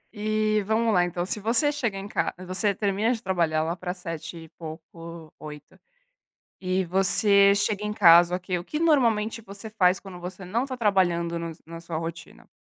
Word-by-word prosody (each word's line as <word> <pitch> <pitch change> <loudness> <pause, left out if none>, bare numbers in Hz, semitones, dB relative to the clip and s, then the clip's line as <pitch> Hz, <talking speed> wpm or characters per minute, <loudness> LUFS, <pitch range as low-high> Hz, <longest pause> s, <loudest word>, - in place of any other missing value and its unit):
E 215 0 0
vamo 225 +1 +1
lá 180 -4 +3
então, 175 0 -3
se 205 - -3
você 230 +8 +2
chega 240 -9 -3
em 195 +1 -6
ca - - -2
você 185 +3 -1
termina 205 +3 0
de 235 - -2
trabalhar 170 -4 0
lá 165 +2 -2
pra 180 0 -5
19h 165 -2 -7
e 160 -1 -12
pouco, 165 0 -11
20h 150 -1 -9 1.0
e 185 0 -1
você 200 +2 +5
chega 205 0 -1
em 210 - -2
casa, 175 -3 +6
o - - -4
que 180 0 -3
o 175 - -6
que 300 - -5
normalmente 230 -8 +1
você 200 +1 -8
faz 190 -4 +2
quando 190 -3 -11
você 180 +2 -8
não 230 +8 -1
tá 260 -2 -6
trabalhando 175 -6 +1
no 170 0 -5
s 160 - -12
na 165 +1 -9
sua 165 -1 -6
rotina? 165 +1 -8
190 Hz, 195 wpm, -25 LUFS, 170-215 Hz, 1.0 s, casa